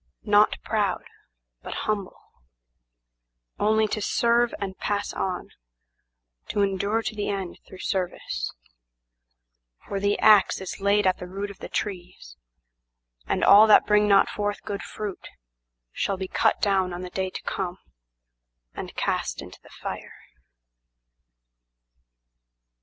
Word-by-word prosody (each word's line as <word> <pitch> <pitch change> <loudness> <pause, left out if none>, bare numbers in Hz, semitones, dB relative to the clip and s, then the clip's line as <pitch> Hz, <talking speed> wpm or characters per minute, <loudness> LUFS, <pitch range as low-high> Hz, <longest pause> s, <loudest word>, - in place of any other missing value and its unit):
Not 210 0 +5
proud, 205 -4 0 0.6
but - - -5
humble, 205 -3 -2 1.4
Only 220 +1 +3
to 215 - -2
serve 235 +3 +2
and 195 -2 -4
pass 205 0 -2
on, 185 -2 -3 1.0
to 205 - +1
endure 200 +3 0
to - - -3
the 210 -1 -3
end 195 -3 -4
through 190 - -11
service; 180 - -2 1.4
For 200 - -2
the 205 +1 +1
ax 210 -2 +5
is 190 0 -7
laid 200 +1 +3
at 185 -1 +2
the 180 - -7
root 200 +2 -5
of 200 - -15
the - - -8
trees, 180 - -5 0.9
and - - 0
all 210 +2 +8
that 215 - +7
bring 210 0 +4
not 200 -1 +5
forth 205 0 -3
good 200 0 -4
fruitShall - - -7
be 190 0 -4
cut - - +2
down 190 -3 +1
on 175 - -5
the 180 -1 -7
day 190 0 -2
to - - -7
come 185 -2 -3 1.0
and - - -7
cast - - -1
into - - -10
the - - -18
fire. - - -7
200 Hz, 130 wpm, -25 LUFS, 185-210 Hz, 1.4 s, all